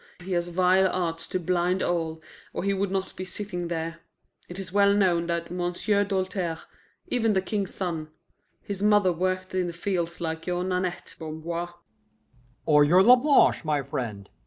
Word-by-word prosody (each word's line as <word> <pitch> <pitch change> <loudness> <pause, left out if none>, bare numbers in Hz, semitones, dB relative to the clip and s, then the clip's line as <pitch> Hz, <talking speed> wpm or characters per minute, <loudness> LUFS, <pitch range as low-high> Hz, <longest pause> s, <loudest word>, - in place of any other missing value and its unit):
He 190 - -7
has 175 -1 0
vile 185 +2 +3
arts 165 -2 -2
to 185 - -2
blind 180 +1 +1
all, 160 -2 -2 0.3
or - - -3
he 200 0 +1
would 195 0 -1
not 190 0 -3
be 185 - -5
sitting 185 -2 -5
there. 165 0 -4 0.5
It 175 - -7
is 190 -1 -7
well 200 0 +5
known 175 -4 +2
that 170 0 -2
M'sieu' 180 +3 0
Doltaire, 185 -4 -2 0.5
even 225 -3 +2
the 190 - +3
King's 200 -2 -2
son 165 -5 -3 0.6
his 200 -1 -5
mother 205 -3 +4
worked 185 +2 -2
in 185 -1 0
the 170 - -5
fields 170 -1 -2
like 160 0 -4
your 180 0 0
Nanette, 180 -1 -2
Bamboir 165 +2 -5 0.5
" 125 0 -35
"Or 150 -2 +6
your 175 +6 +5
Lablanche, 250 +3 +5
my 150 -3 0
friend. 105 -6 -5
180 Hz, 170 wpm, -26 LUFS, 165-190 Hz, 0.6 s, Or